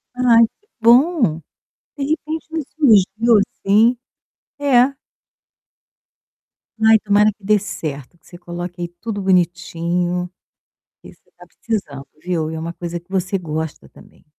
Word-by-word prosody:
Ai, 235 -2 +5 0.2
que 420 - -38
bom. 235 - +4 0.6
De 280 - -5
repente 310 +2 -3
me 320 -2 -2
surgiu 225 -5 +3 0.3
assim 220 +5 +4 0.6
é. 270 -1 +3 1.9
Ai, 220 -1 +6
tomara 210 +1 +3
que 205 - -33
dê 210 +1 +3
certo, 155 - -6
que 165 - -26
você 175 - -12
coloque 175 0 -7
aí 175 - -2
tudo 220 -3 -4
bonitinho, 180 -1 0 0.6
porque - - -16
você - - -37
está - - -18
precisando, 150 -12 -5 0.2
viu. 170 -3 -2
E - - -6
é - - -4
uma 165 +1 -5
coisa 175 0 -5
que 175 +2 -22
você 190 +1 -1
gosta 160 -3 -5
também. - - -19
195 Hz, 140 wpm, -19 LUFS, 175-235 Hz, 1.9 s, Ai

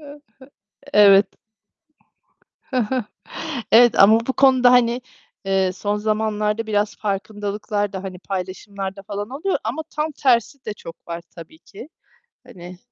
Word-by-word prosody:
Hı - - -17
hı. 295 - -15 0.7
Evet. 200 -1 +7 2.4
Evet 240 0 +6
ama 215 +3 +7
bu 265 - 0
konuda 260 -2 +5
hani, 245 0 +3 0.5
ııı, 190 -1 +1
son 205 +2 -2
zamanlarda 215 +1 -1
biraz 210 -1 0
farkındalıklar 205 0 -3
da 190 0 -5
hani 185 -2 -7
paylaşımlar 195 +1 -5
da 195 - -10
falan 205 +1 -5
oluyor 305 +9 -2
ama 250 +9 -3
tam 305 +1 -1
tersi 265 -1 0
de 215 - -4
çok 165 -4 -13
var 170 0 -5
tabii 165 -2 -12
ki. 205 - -13 0.6
Hani 180 0 -11
210 Hz, 130 wpm, -21 LUFS, 195-235 Hz, 2.4 s, Evet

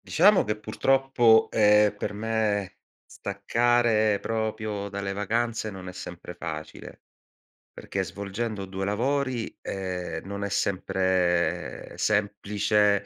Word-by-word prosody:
Diciamo - - +5
che 105 0 -2
purtroppo, 120 +1 +3
ehm, 105 -1 +5
per 105 - -4
me 105 -3 -1 0.3
staccare 110 +1 +1
proprio 110 -2 -3
dalle 100 -1 -3
vacanze 110 +2 -1
non 95 -3 -9
è 90 - -7
sempre 90 -1 -8
facile, 80 -3 -7 0.7
perché - - -4
svolgendo 100 +1 -4
2 95 0 -5
lavori, 125 +4 -1
ehm, 90 -4 -4
non 100 +1 -5
è 100 - -2
sempre 90 -3 0
semplice, 105 0 +1
105 Hz, 105 wpm, -26 LUFS, 95-110 Hz, 0.7 s, Diciamo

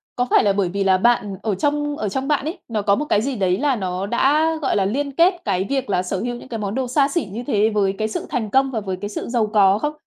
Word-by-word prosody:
Có 245 - 0
phải - - +4
là 200 -1 +3
bởi 195 -3 0
vì 200 +2 -1
là 190 -1 +4
bạn 205 -2 +1
ở 215 -3 0
trong 295 +5 -1
ở 210 - -2
trong 265 +7 -3
bạn 295 -1 0
ấy, 320 - -4
nó 220 -3 -2
có 200 0 +3
một 295 - -2
cái 210 -7 +2
gì 270 +1 -2
đấy 185 -3 +1
là 280 +2 +1
nó 185 -3 -3
đã, 285 +9 +2
gọi 280 - 0
là, 195 -2 +2
liên 280 +7 -1
kết 340 +7 +4
cái 190 -2 0
việc 270 -4 -1
là 180 -2 +1
sở 185 +1 -3
hữu 240 +4 -3
những 240 - -11
cái 235 - -5
món 205 -1 -3
đồ 260 -1 -1
xa 275 +3 +2
xỉ 300 0 -1
như 230 +4 -5
thế 215 -5 +2
với 200 -3 +1
cái 215 - -1
sự 215 - -4
thành 220 -4 -2
công 270 +3 +2
và 230 - -2
với 190 -3 -4
cái 205 - -4
sự 210 - -5
giàu 235 -3 +1
có 200 -2 +4
không? 295 +4 -2
220 Hz, 305 wpm, -21 LUFS, 200-270 Hz, -, phải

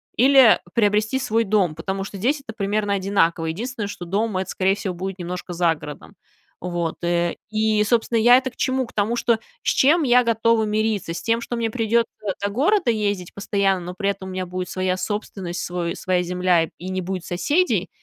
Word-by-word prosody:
или 265 -2 +6 0.2
приобрести 215 +3 +2
свой 230 -3 +1
дом, 195 -6 +1
потому 190 +4 -3
что 200 +1 -8
здесь 270 +9 0
это 225 - -6
примерно 205 -1 -1
одинаково. 185 -4 +1
Единственное, 215 +5 -4
что 180 -3 -7
дом- 200 +3 -1
это, 190 0 -3
скорее 190 +1 +1
всего, 195 -2 -4
будет 190 +2 -5
немножко 180 +1 -5
за 170 -1 +2
городом. 150 -1 -10 0.5
Вот. 175 -2 -3
Э, 175 0 0
и, 215 -1 +2
собственно, 230 +2 +1
я 245 +3 +7
это 260 0 -1
к - - -26
чему? 260 0 0
К - - -16
тому, 210 +3 0
что 235 -2 +2 0.3
с - - +1
чем 310 +5 +4
я 250 -2 +5
готова 230 0 +2
мириться? 215 -4 -1
С - - -5
тем, 230 0 0
что 240 0 -4
мне 230 -1 0
придется 230 0 +1 0.3
до 200 - 0
города 325 - +2
ездить 205 -5 -2
постоянно, 195 -2 0
но 180 - -6
при 200 -1 0
этом 190 -1 -8
у - - -6
меня 185 0 -3
будет 180 0 -5
своя 185 -1 -1
собственность, 190 -3 -4
свой 175 -1 -3
своя 185 -1 0
земля 180 -2 +1
и 180 +3 -7
не 185 0 -2
будет 185 -1 -4
соседей? 290 - +1
200 Hz, 200 wpm, -22 LUFS, 180-230 Hz, 0.5 s, я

